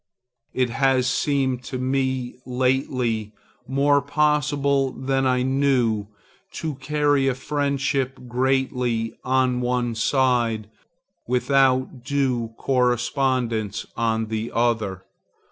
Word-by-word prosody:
It 125 -2 +1
has 135 0 +2
seemed 130 -1 0
to 130 - -4
me 130 -1 -1
lately 125 -4 -1 0.3
more 140 +2 +3
possible 145 -2 +1
than 135 0 0
I 125 -1 +2
knew, 130 -6 +1 0.5
to 160 -2 -3
carry 145 0 +1
a 130 - +1
friendship 140 -1 -1
greatly, 125 -2 0
on 130 -1 +1
one 125 -1 0
side, 115 -3 +1 0.6
without 130 0 +2
due 125 -5 -1
correspondence 125 -4 0
on 115 -1 0
the 110 +1 -3
other. 110 -6 0
130 Hz, 95 wpm, -23 LUFS, 120-135 Hz, 0.6 s, more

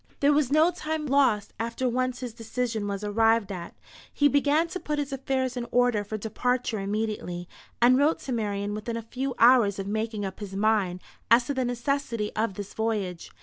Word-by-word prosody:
There 285 +1 +4
was 290 -3 +2
no 315 +4 +5
time 315 -2 -3
lost 265 -7 +2
after 235 +3 -2
once 255 +1 -1
his 245 -3 -5
decision 225 -1 -3
was 200 0 -3
arrived 225 0 +2
at. 175 -3 -7 0.4
He 290 - +3
began 285 +3 +3
to 370 - -4
put 300 -3 -3
his 285 -1 -2
affairs 260 -1 -1
in 240 -1 -4
order 245 -4 +2
for 215 +2 -5
departure 240 +1 -1
immediately, 195 -3 -3 0.4
and 255 +2 +6
wrote 295 +3 +3
to 265 - -6
Marian 205 -3 -2
within 220 +2 -4
a 230 - -5
few 260 +3 -4
hours 235 -5 +5
of 195 - -4
making 215 0 -2
up 190 -1 -6
his 200 -2 -7
mind 200 -3 +1 0.3
as 235 +2 +6
to 285 - -2
the 260 -2 0
necessity 240 -3 -2
of 215 -3 -1
this 200 -1 -7
voyage. 210 -6 -2
230 Hz, 190 wpm, -27 LUFS, 210-260 Hz, 0.4 s, and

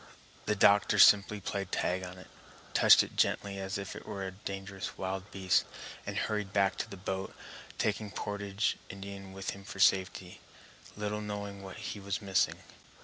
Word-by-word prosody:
The 105 - +2
doctor 100 +1 +5
simply 105 +1 +7
played 100 -1 -4
tag 90 +1 0
on 90 0 -7
it, 90 - -11 0.5
touched - - +8
it - - -10
gently 100 -1 +1
as 95 0 -3
if 100 -2 -6
it - - -10
were 100 -2 -4
a 95 - -4
dangerous 95 0 -6
wild 95 +1 -4
beast, 95 -2 +2 0.4
and - - -3
hurried 105 -2 -1
back 100 -1 +2
to - - -3
the 100 - -8
boat, 95 +1 -4 0.4
taking 105 0 0
the - - -15
portage 100 +1 -1
Indian 100 0 -8
with 95 0 -4
him 100 - -10
for 95 - -9
safety, 95 -1 +2 0.6
little 105 0 -2
knowing 100 -1 -5
what 95 0 -9
he 105 0 -5
was 100 0 -2
missing. 95 -2 +1
100 Hz, 175 wpm, -31 LUFS, 95-100 Hz, 0.6 s, touched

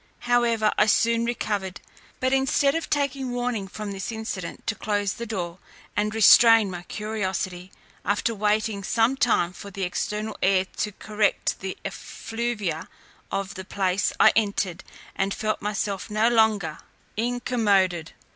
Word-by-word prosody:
However, 235 -3 +2
I 210 - +5
soon 230 +2 +3
recovered: 205 -5 -2 0.4
but 260 +1 +1
instead 270 +1 +3
of 330 +1 -3
taking 275 -3 -1
warning 245 -5 -2
from 210 +1 -6
this 195 +3 -4
incident 220 -5 -5
to - - 0
close 205 -2 -1
the 235 - -6
door, 180 -5 -4 0.4
and 210 +1 0
restrain 225 -1 +7
my 175 -1 -6
curiosity, 190 -3 -4 0.3
after 205 +3 0
waiting 210 0 0
some 230 +6 +2
time 205 -9 +2
for 200 - -9
the 195 0 -5
external 210 +4 -2
air 190 0 +3
to 210 - -1
correct 210 +1 0
the 190 -1 -5
effluvia 220 -8 -4 0.4
of 195 0 -2
the 190 -2 -7
place, 185 0 0
I - - +7
entered, 200 -5 0 0.3
and 195 +1 0
felt 215 0 -2
myself 205 -1 -2
no 215 +2 +3
longer 220 -8 +2 0.4
incommoded. 210 -8 +1
210 Hz, 140 wpm, -25 LUFS, 195-230 Hz, 0.4 s, restrain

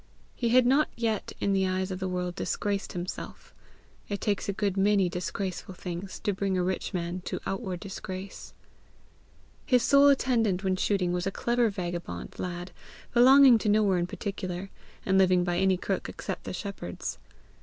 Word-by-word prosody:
He 235 - -1
had 250 +1 +5
not 275 +5 +4
yet 225 -3 -1
in 200 - +1
the 190 -1 +2
eyes 185 +1 -1
of 185 - -4
the 190 - -2
world 180 -1 -2
disgraced 200 +2 -2
himself: 180 +1 -6 0.6
it 200 -1 -2
takes 205 -1 -1
a - - 0
good 195 -1 -1
many 195 -1 +3
disgraceful 185 +1 -4
things 180 +2 -6
to 205 -2 0
bring 190 0 -1
a 180 - +1
rich 185 +1 -2
man 180 -1 -3
to - - -3
outward 195 -3 -3
disgrace. 190 -1 -7 1.1
His 250 -3 +3
sole 280 0 +6
attendant 230 -9 +2
when 190 -1 +1
shooting 185 -2 0
was 180 +1 -1
a - - 0
clever 240 +2 +1
vagabond 175 - -5
lad 175 0 -4 0.4
belonging 255 0 +8
to 210 - 0
nowhere 205 -3 +3
in 175 - -1
particular, 190 -1 -5 0.3
and 190 0 +3
living 185 -1 +4
by 175 0 0
any 190 -1 +3
crook - - -3
except - - -6
the - - -4
shepherd's. 200 - -5
190 Hz, 170 wpm, -28 LUFS, 180-210 Hz, 1.1 s, belonging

